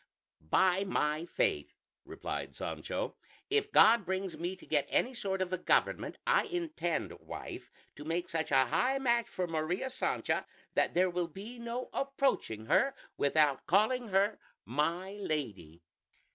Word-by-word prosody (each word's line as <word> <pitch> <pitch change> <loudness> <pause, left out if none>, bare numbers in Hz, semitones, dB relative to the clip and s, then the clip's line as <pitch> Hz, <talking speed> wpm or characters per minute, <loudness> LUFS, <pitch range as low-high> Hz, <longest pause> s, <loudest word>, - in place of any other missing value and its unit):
"By 190 - +4
my 155 -3 0
faith," 465 - 0 0.3
replied - - -5
Sancho, - - -4 0.3
"if 425 0 +2
God 225 0 +7
brings 190 0 -2
me 175 +3 -3
to 185 - -15
get 145 -3 +1
any 255 - +1
sort 195 -5 -1
of 185 0 -6
a 185 - -1
government, - - +1
I - - +4
intend, 320 - -2
wife, - - -8 0.3
to 145 - -8
make 165 +3 -2
such 160 -1 -2
a 135 -1 +5
high 255 - +1
match 240 -3 +2
for 185 - -2
Maria 175 +9 -2
Sancha 260 - -1 0.3
that - - +1
there 180 +1 +3
will 175 -1 -1
be 210 +9 -9
no 235 +2 -4
approaching 270 - 0
her 270 - +3 0.2
without 145 -1 +2
calling 225 +6 +3
her 200 +2 +2 0.3
'my 165 - -1
lady.'" 100 - -4
185 Hz, 145 wpm, -32 LUFS, 155-240 Hz, 0.3 s, God